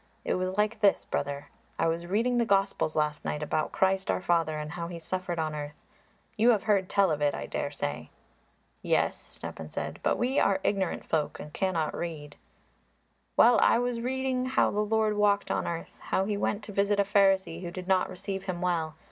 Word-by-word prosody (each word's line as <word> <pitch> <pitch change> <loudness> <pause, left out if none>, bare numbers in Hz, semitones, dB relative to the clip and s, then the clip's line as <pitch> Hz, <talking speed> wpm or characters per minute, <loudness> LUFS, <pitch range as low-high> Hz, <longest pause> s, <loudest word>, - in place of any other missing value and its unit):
It - - +1
was 185 +1 -2
like 215 +1 +1
this, 205 -2 +3
brother; 140 0 -3 0.3
I - - +1
was 165 +1 -2
reading 235 +6 +1
the - - +4
Gospels 195 -6 +1
last 150 -1 0
night 150 - -2
about 155 +1 -1
Christ 190 0 +1
our - - +2
Father 165 -3 +1
and 150 0 -5
how 170 0 -4
He 170 0 -6
suffered 175 +1 -3
on 155 -1 -1
earth. 150 0 -7 0.5
You 225 +3 +4
have 215 -5 +3
heard 200 -3 +2
tell 195 -3 +3
of 150 -1 -1
it, 145 -1 +2
I - - -5
daresay." - - -4 0.7
"Yes," - - +1
Stepan 80 -1 -9
said, - - -5
"but - - +1
we 255 +3 +1
are 195 -1 +3
ignorant 195 -3 0
folk 150 -2 -1
and 150 - -9
cannot 170 -5 0
read." 150 -4 -5 1.0
"Well, 235 0 +7
I - - +5
was 245 -1 -1
reading 255 0 -1
how 260 - +2
the 205 - -1
Lord 215 0 +1
walked 205 -1 +2
on - - -1
earth, 170 -1 -5
how 190 - +1
He 210 0 -1
went 205 +1 -1
to 210 - -8
visit 200 +1 +1
a - - +5
Pharisee 195 -4 +2
who 175 - -4
did 180 +1 -7
not 190 -1 +2
receive 195 +1 -5
Him 185 -2 -3
well. 170 -3 -1
190 Hz, 200 wpm, -28 LUFS, 165-205 Hz, 1.0 s, Well